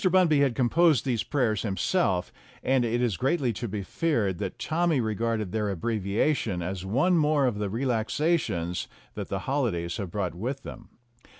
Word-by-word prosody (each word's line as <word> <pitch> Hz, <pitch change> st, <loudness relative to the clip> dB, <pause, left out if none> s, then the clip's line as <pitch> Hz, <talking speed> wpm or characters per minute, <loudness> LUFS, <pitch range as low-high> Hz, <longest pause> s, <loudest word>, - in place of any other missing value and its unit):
Bunby 180 Hz, -5 st, +4 dB
had 135 Hz, -4 st, +2 dB
composed 150 Hz, +3 st, +3 dB
these 120 Hz, -5 st, 0 dB
prayers 120 Hz, -8 st, 0 dB
himself, 100 Hz, -, 0 dB, 0.3 s
and 130 Hz, -1 st, +3 dB
it 120 Hz, +1 st, 0 dB
is 110 Hz, -8 st, 0 dB
greatly 135 Hz, -, +1 dB
to 120 Hz, +4 st, -4 dB
be 100 Hz, -1 st, -4 dB
feared 105 Hz, -, 0 dB
that 95 Hz, -3 st, -4 dB
Tommy 165 Hz, -2 st, +1 dB
regarded 110 Hz, -2 st, -1 dB
their 105 Hz, -1 st, -1 dB
abbreviation 100 Hz, -, 0 dB
as 90 Hz, +1 st, -4 dB
one 135 Hz, -, +2 dB
more 150 Hz, -2 st, +3 dB
of 115 Hz, -5 st, 0 dB
the 105 Hz, -1 st, -1 dB
relaxations 115 Hz, -, 0 dB, 0.3 s
that -, -, -5 dB
the -, -, -2 dB
holidays 110 Hz, -12 st, -1 dB
had 100 Hz, -5 st, -4 dB
brought 95 Hz, -1 st, -2 dB
with 125 Hz, +10 st, -4 dB
them. -, -, -10 dB
115 Hz, 165 wpm, -27 LUFS, 100-140 Hz, 0.3 s, Bunby